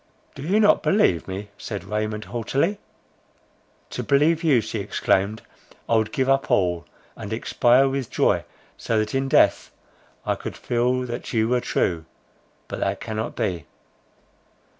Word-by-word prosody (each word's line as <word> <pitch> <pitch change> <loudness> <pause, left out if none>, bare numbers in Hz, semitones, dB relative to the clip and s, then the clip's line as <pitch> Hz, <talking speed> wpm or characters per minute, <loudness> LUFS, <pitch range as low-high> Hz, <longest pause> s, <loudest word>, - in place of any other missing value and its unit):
"Do 135 - -10
you 185 +9 +2
not 210 -1 +5
believe 145 - +2
me?" 100 +2 -6
said 100 -3 -5
Raymond 105 0 -3
haughtily. 135 - -1 1.1
"To - - -3
believe 155 +4 +2
you," 145 -7 +4
she 110 0 -4
exclaimed, 100 +1 0 0.4
"I 115 - +2
would 110 -1 0
give 130 -3 0
up 135 0 +2
all, 90 -3 +1 0.3
and 105 -2 -8
expire 120 +3 +3
with 135 -2 -2
joy, - - +2 0.3
so 115 - -1
that 110 0 -1
in 135 0 0
death - - +3 0.6
I - - +1
could - - -7
feel 125 +1 0
that 120 0 -6
you 110 -1 +2
were 125 0 +2
true—but 80 -7 -5
that 95 0 -1
cannot 110 0 -4
be!" 85 -7 -2
115 Hz, 145 wpm, -23 LUFS, 105-135 Hz, 1.1 s, not